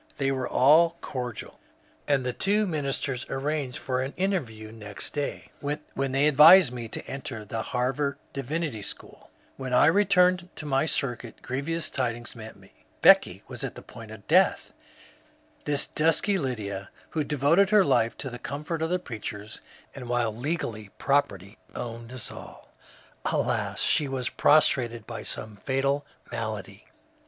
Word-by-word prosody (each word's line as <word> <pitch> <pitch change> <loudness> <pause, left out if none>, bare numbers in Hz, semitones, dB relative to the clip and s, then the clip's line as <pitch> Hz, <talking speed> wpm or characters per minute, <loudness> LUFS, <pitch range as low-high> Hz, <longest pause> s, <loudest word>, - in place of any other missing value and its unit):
They 135 -1 +1
were 130 -2 -2
all 165 +5 +5
cordial, 125 -4 -6 0.5
and 140 -3 +2
the 125 - -1
two 205 - +2
ministers 140 -6 -2
arranged 135 -1 -2
for 130 -1 -2
an 135 +2 -4
interview 125 - -2
next 105 -3 -7
day, 145 -1 -4
when 145 -2 -3
they 135 +3 +3
advised 150 0 +8
me 120 -2 -5
to - - -5
enter 125 -5 -6
the 110 +2 -3
Harvard 130 +4 -1 0.2
Divinity 140 -3 -3
SchooL - - -8 0.3
When 130 -2 -2
I - - +6
returned 180 -1 +4
to 155 - -8
my 135 +1 +1
circuit 125 -5 -2
grievous 150 +6 -2
tidings 120 -2 -3
met 110 -1 -9
me. - - -19 0.3
Becky - - +6
was - - -6
at - - -4
the - - -10
point 115 -3 -11
of 105 -2 -12
death 185 +4 +3
I - - -30 0.8
This 145 -1 +1
dusky 165 +6 +1
Lydia, 100 - -4 0.2
who 155 - 0
devoted 150 +7 +3
her 210 -2 +5
life 115 -5 +2
to 135 - -5
the 125 - -7
comfort 150 +5 -4
of 160 - 0
the 180 - +2
preachers, 110 - -7 0.3
and 125 -3 -8
while 120 -3 0
legally 120 - -3
property 105 -8 0 0.2
owned 115 0 -6
us 130 -3 -6
all - - -12 0.3
— - - -30
alas, - - -1
she 150 - +3
was 130 -2 -2
prostrated 125 -7 +3
by - - -6
some 110 -1 -5
fatal 135 +5 -1 0.2
malady. 110 -3 -5
135 Hz, 155 wpm, -27 LUFS, 120-150 Hz, 0.8 s, advised